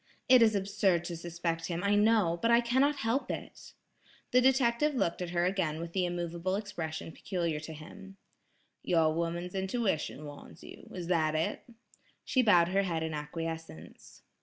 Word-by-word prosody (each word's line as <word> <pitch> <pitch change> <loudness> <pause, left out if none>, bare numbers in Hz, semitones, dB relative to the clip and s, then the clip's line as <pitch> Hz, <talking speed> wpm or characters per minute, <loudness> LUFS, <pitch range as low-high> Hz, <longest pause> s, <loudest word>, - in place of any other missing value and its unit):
It 255 -2 +7
is 220 -2 +5
absurd 195 -3 +1
to 175 - -4
suspect 170 0 -3
him 175 +1 -3
I 200 0 +2
know, 205 -5 +3
but 230 - +2
I 235 0 +6
cannot 260 +5 +2
help 245 +5 0
it." - - -7 0.6
The 250 - +5
detective 260 +2 +3
looked 170 -8 0
at 180 - -3
her 175 0 +1
again 175 -5 -1
with 170 0 -6
the 185 -2 +1
immovable 175 +1 -2
expression 170 -7 -5
peculiar 170 -4 -2
to 160 +1 -8
him. 195 +6 -12 0.6
"Your 165 -3 +2
woman's 170 +2 -3
intuition 190 - -2
warns 145 +2 -11
you; - - -12
is 180 -2 -6
that 160 -3 +1
it?" 160 +9 -2 0.6
She 260 - +2
bowed 175 -7 +5
her 195 +2 +2
head 170 -4 -2
in 160 -1 -3
acquiescence. 160 - -7
175 Hz, 165 wpm, -31 LUFS, 165-205 Hz, 0.6 s, It